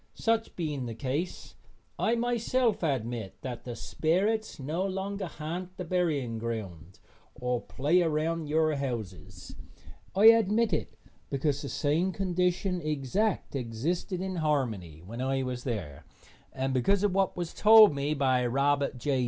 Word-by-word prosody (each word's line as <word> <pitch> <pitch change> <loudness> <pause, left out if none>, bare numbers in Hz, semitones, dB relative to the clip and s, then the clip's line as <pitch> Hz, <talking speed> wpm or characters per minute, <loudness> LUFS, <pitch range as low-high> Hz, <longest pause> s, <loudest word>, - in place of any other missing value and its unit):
Such 225 0 0
being 150 -7 -3
the 115 - -5
case, 140 +9 -3 0.5
I 230 - +2
myself 240 0 +1
admit 120 - -2
that 125 -3 -6
the 120 -2 -5
sperrits 200 - 0
no 155 +7 -2
longer 195 0 -3
ha'nt 175 +4 -6
the 180 - -4
burying 150 -10 0
ground 95 -7 -6 0.4
or 125 -1 -1
play 155 +7 +1
around 160 0 0
your 155 +1 +2
houses. 115 -9 -6 0.6
I 200 +3 +4
admit 225 -1 +3
it 155 - -3 0.3
because 140 0 0
the 140 - -5
same 160 +6 +1
condition 180 0 0
exact 155 - -1
existed 140 - -2
in 190 -1 -3
Harmony 115 - -1
when 115 +6 -6
I 135 0 0
was 125 -1 -4
there, 85 - -4 0.5
and 135 0 -2
because 190 +11 +2
of 205 -3 +2
what 195 -1 +1
was 175 -2 -4
told 215 -3 +8
me 140 +2 -1
by 130 -3 +2
Robert 140 +1 +1
J. 135 +2 0
150 Hz, 145 wpm, -29 LUFS, 125-185 Hz, 0.6 s, told